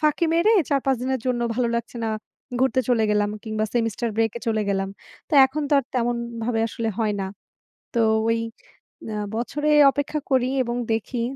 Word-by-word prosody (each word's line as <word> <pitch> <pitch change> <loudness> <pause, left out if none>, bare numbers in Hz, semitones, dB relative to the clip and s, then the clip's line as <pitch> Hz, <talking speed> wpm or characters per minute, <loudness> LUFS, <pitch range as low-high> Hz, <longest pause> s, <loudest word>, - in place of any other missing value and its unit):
ফাঁকি 305 +2 +2
মেরে 355 +7 +4 0.2
৪, 280 -2 +2
৫ 270 -1 +3
দিনের 260 -1 -1
জন্য 250 -1 0
ভালো 245 0 +1
লাগছে 235 +1 -5
না। - - 0 0.5
ঘুরতে 260 0 +3
চলে 235 -3 +3
গেলাম 205 0 +2
কিংবা 215 -1 -1
সেমিস্টার 230 0 0
ব্রেকে 225 +1 +1
চলে 220 -2 +1
গেলাম। 195 -1 0 0.4
তো - - -21
এখন 295 +3 -4
তো - - -2
আর 275 - -1
তেমনভাবে 235 -1 -1
আসলে 225 +1 -3
হয় 215 -2 +1
না। 190 - -2 0.7
তো 235 - +2 0.3
ওই 230 - +2 0.8
আ - - -3 0.2
বছরে 295 +6 -1 0.2
অপেক্ষা 290 +1 -2
করি 255 -1 +3
এবং 240 0 -3 0.2
দেখি। 230 +2 -2
235 Hz, 175 wpm, -24 LUFS, 225-265 Hz, 0.8 s, মেরে